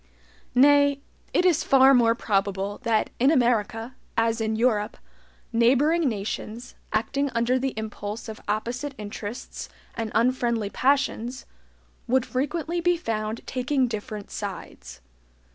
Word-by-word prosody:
Nay, 285 +1 +5 0.3
it 360 - +2
is 335 -3 +3
far 270 0 +6
more 230 -2 +4
probable 200 -2 -1
that 230 -3 +1
in 260 +3 +5
America, 235 -4 +1 0.2
as 225 0 +1
in 220 0 0
Europe, 220 -3 +1 0.6
neighboring 270 +7 +3
nations, 220 +2 -5 0.2
acting 275 +6 0
under 240 +2 +2
the 270 0 -2
impulse 220 0 -5
of 220 -1 -8
opposite 240 +7 -2
interests 210 +2 -7 0.2
and 225 -1 -4
unfriendly 235 -3 +1
passions, 265 -2 0 0.6
would 255 +1 +2
frequently 320 +7 -2
be 350 0 +2
found 220 -6 -3
taking 260 +1 0
different 215 -2 -6
sides. 65 - -7
235 Hz, 120 wpm, -25 LUFS, 215-270 Hz, 0.6 s, far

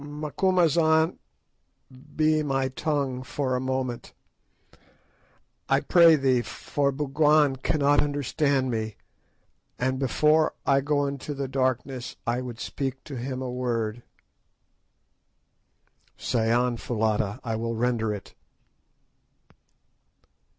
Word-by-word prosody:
"Macumazahn, 160 +2 +1 1.0
be 155 0 +3
my 135 -2 0
tongue 135 -2 -2
for 130 0 -2
a - - 0
moment, 130 -2 -3 1.6
I - - +4
pray 170 -2 +6
thee, 130 -4 +2
for 140 +4 -2
Bougwan 150 0 +2
cannot 145 +1 +2
understand 140 -2 0
me, 110 -2 -3 0.8
and 130 +1 -1
before 150 +4 +2
I 140 0 +3
go 145 0 +1
into 140 +1 -4
the 140 -1 -3
darkness 130 -1 -2
I 120 +2 0
would 120 -2 -7
speak 135 -1 -4
to 140 - -8
him 130 +1 -4
a 125 - -4
word." 120 -2 -2 2.2
"Say 115 -1 0
on, 120 0 +2
Foulata, 110 -2 -1
I 115 -2 -2
will 115 +1 -2
render 115 -2 0
it." 100 -3 -7
130 Hz, 105 wpm, -26 LUFS, 120-145 Hz, 2.2 s, pray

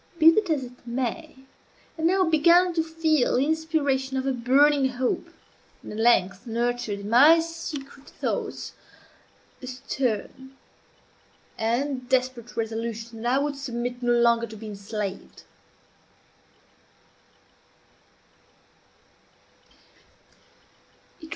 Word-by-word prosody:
Be 325 0 +8
this 410 +1 0
as 300 -4 0
it 245 0 -13
may, 260 +6 -3 0.6
I 320 - -8
now 370 +4 +3
began 340 +3 +4
to 330 - +1
feel 320 -5 +1
the 265 - +2
inspiration 290 -4 0
of 260 - -2
a 270 - +1
burning 265 +3 +3
hope, 250 0 -2 0.6
and - - -9
at 210 - -6
length 200 -2 +2
nurtured 235 -2 -2
in 200 - -6
my 295 +8 +7
secret 300 -4 -7
thoughts - - -4 0.9
a 255 - -8
stern 260 +1 -4 1.0
and 255 +3 -2
desperate 255 -2 -1
resolution 225 0 -4
that 240 +1 0
I 275 - +2
would 290 -1 -2
submit 245 -2 -4
no 240 0 +2
longer 235 -1 +3
to 220 0 -10
be 220 - -10
enslaved. 200 -1 -6
255 Hz, 105 wpm, -25 LUFS, 235-295 Hz, 1.0 s, Be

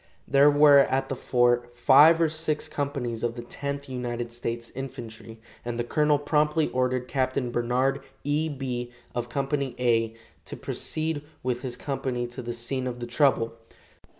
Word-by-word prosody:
There 140 +1 +6
were 145 -1 +7
at 135 0 +2
the 135 - -2
fort 120 -1 +1
five 150 +6 +7
or 165 - +4
six 155 -1 -1
companies 135 -6 -3
of 120 0 -1
the 120 - -6
Tenth 140 +3 -5
United 120 -2 -4
States 115 -1 -5
Infantry, 115 -4 -8 0.2
and 120 -1 -4
the 120 - 0
colonel 150 +4 +2
promptly 150 +1 +1
ordered 125 0 0
Capt. 130 -1 -1 0.2
Barnard 125 +3 0 0.2
E. 150 +3 0
Bee 125 -4 -4 0.2
of 120 0 -3
Company 140 +1 -2
"A" 115 -2 +1 0.3
to - - -8
proceed 155 -1 -2 0.2
with 125 -1 -1
his 125 -2 -5
company 130 -3 -2
to 120 +2 -7
the 120 -1 -5
scene 125 +2 -3
of 125 -1 -5
the 120 - -4
trouble. 120 -2 +2
130 Hz, 160 wpm, -26 LUFS, 120-140 Hz, 0.3 s, were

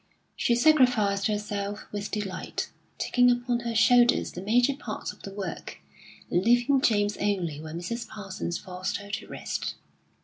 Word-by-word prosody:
She 235 - +2
sacrificed 240 -8 +4
herself 205 -1 -3
with 205 0 -4
delight, 205 -3 -4 0.3
taking 245 0 +3
upon 245 0 +1
her 235 -1 -4
shoulders 240 +2 +5
the 180 - -7
major 245 +7 +3
part 230 -6 -5
of - - -19
the 195 - -7
work, 195 -3 -6 0.5
leaving 240 +8 +3
James 205 -5 +2
only 175 -8 -1
when 160 +1 -6
Mrs. 225 +7 -4
Parsons 195 -4 -5
forced 185 +2 -4
her 205 0 -10
to - - -4
rest. - - -4
210 Hz, 145 wpm, -27 LUFS, 195-240 Hz, 0.5 s, shoulders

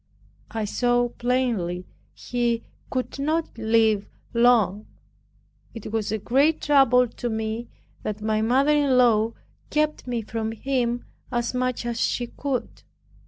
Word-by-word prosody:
I 225 -2 -2
saw 245 +3 +1
plainly 235 -9 -1 0.3
he 235 -1 -1 0.3
could 255 +1 -3
not 310 +3 -1
live 220 -2 +2 0.2
long. 225 -4 +3 0.9
It 225 -2 -7
was 220 -2 -1
a 220 - 0
great 275 +9 +2
trouble 270 -4 +4
to 240 +1 -5
me, 220 +1 -3 0.3
that 210 0 -4
my 215 0 0
mother 260 +6 +3
in 280 -3 +3
law 230 -2 +4 0.4
kept 300 -2 0
me 240 -2 -2
from 220 +1 -3
him 245 -1 -1 0.3
as 240 0 -1
much 255 -1 -1
as 235 -1 -2
she 245 - 0
could. 265 +1 -4
240 Hz, 130 wpm, -24 LUFS, 220-255 Hz, 0.9 s, trouble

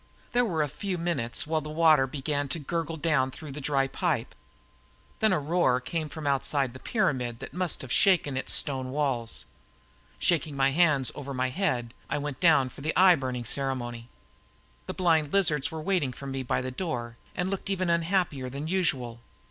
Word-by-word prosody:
There 245 0 +3
were 165 -8 0
a - - -1
few 180 +6 -4
minutes 165 -9 -1
while 155 0 0
the 150 - -7
water 155 -3 +4
began 145 +1 -2
to 135 - -2
gurgle 165 +1 -3
down 150 -4 +2
through 145 +2 -9
the 145 +2 -6
dry 135 -1 +1
pipe. 135 - -1 0.9
Then 220 -1 +4
a 185 - +3
roar 150 -4 +2
came 155 +4 -3
from 155 0 -7
outside 140 -2 +1
the 130 - -10
pyramid 130 - 0
that - - -9
must 180 -5 0
have 130 - -8
shaken 175 -7 +4
its 135 - -2
stone 130 -2 0
walls. 130 -5 -1 0.7
Shaking 155 -4 0
my 135 0 +3
hands 150 -5 +3
once - - -8
over 140 -1 -6
my 130 0 0
head, 125 -8 -1 0.2
I - - 0
went 145 -2 -4
down 145 -7 +5
for 130 - -12
the 155 +3 -1
eye 185 0 +8
burning 130 -6 -3
ceremony. 120 -2 -2 0.8
The - - -4
blind 160 -5 +2
lizards 150 -8 +3
were 160 -1 -6
waiting 175 -9 0
for 140 - -9
me 135 -1 -3
by 125 - -1
the 130 0 -4
door 125 -7 -4 0.2
and 180 +2 -1
looked 195 0 -4
even 185 -3 0
unhappier 170 -6 0
than 140 +4 -5
usual. 135 -10 0
145 Hz, 190 wpm, -28 LUFS, 130-170 Hz, 0.9 s, eye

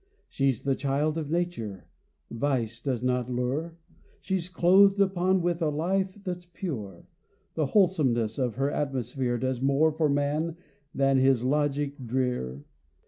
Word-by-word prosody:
She's 135 -4 0
the 135 - +1
child 145 +3 0
of 150 -2 -5
nature; 160 - -3 0.5
vice 115 -2 -1
does 125 -4 -2
not 125 -1 0
lure; 135 +7 -2 0.4
She's 185 -2 -2
clothed 195 +3 +5
upon 190 -1 +2
with 175 0 0
a 160 - +2
life 185 +6 -1
that's 180 -2 -5
pure. 125 - -6 0.5
The 155 -3 0
wholesomeness 135 - +2
of 125 -4 -1
her 135 +3 0
atmosphere 130 -3 -2
Does 130 0 -2
more 140 +4 +3
for 155 0 +1
man 150 +4 0 0.4
than 135 -1 +3
his 130 -2 +3
logic 145 0 0
drear. 120 - -2
140 Hz, 140 wpm, -27 LUFS, 125-170 Hz, 0.5 s, clothed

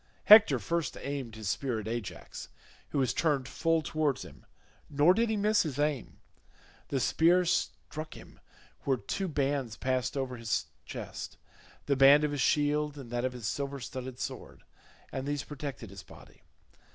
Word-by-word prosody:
Hector 215 0 +9
first 170 -2 -2
aimed 135 -5 -5
his 110 -2 -6
spear 125 -1 -1
at 110 - -6
Ajax, 115 -3 -6 0.4
who - - -3
was 130 -6 +2
turned 145 -5 +1
full 165 +3 +1
towards 150 -4 -1
him, 70 -2 -15 0.4
nor 150 +5 +5
did 230 +3 +1
he 220 - 0
miss 210 +1 +3
his 145 -5 -3
aim. 145 -4 -1 0.7
The 135 - -1
spear 175 +7 +4
struck 155 -2 -2
him - - -14 0.4
where 135 -2 0
two 185 - -3
bands 140 -6 -1
passed 130 +1 -1
over 130 -2 -2
his 115 -1 -1 0.2
chest—the 140 - -6
band 140 +2 +7
of 150 - +1
his 145 -2 -2
shield 150 +1 +1
and 130 -4 -9
that 120 +1 -1
of 130 - -1
his 120 -4 -5
silver 140 +5 -3
studded 130 0 -6
sword—and 135 +1 -8
these 145 -1 -1
protected 140 -7 -7
his 100 -1 -9
body. - - -16
140 Hz, 160 wpm, -30 LUFS, 125-150 Hz, 0.7 s, Hector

